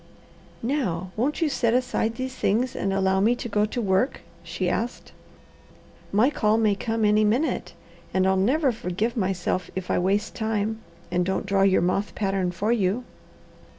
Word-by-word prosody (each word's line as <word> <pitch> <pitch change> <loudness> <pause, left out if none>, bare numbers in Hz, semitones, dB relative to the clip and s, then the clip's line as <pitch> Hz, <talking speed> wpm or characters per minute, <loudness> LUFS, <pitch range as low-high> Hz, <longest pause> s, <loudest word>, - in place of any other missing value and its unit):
"Now 190 - -1
won't 285 +9 0
you - - +3
set 235 -5 +1
aside 245 -3 0
these 260 +1 -4
things 235 +5 0
and 195 - -1
allow 190 0 +2
me 225 +5 +3
to 245 - -5
go 210 -1 +1
to 215 - -4
work?" 195 +4 +1 0.2
she - - -3
asked. 240 +2 -3 1.0
"My 225 +8 +4
call 215 -5 +2
may 215 -2 +3
come 225 +2 -1
any 210 +1 +4
minute, 235 +9 0 0.4
and 185 0 +2
I'll 190 0 +3
never 260 +9 +2
forgive 215 +2 -2
myself 185 -4 -1
if 185 -1 -3
I - - +2
waste 200 +4 0
time, 220 -1 -1 0.3
and 180 0 +2
don't 190 +2 -1
draw 195 -1 +1
your 195 -3 +4
moth 195 +3 -1
pattern 195 -3 0
for 195 +6 -1
you." 215 +1 +1
210 Hz, 170 wpm, -25 LUFS, 190-235 Hz, 1.0 s, My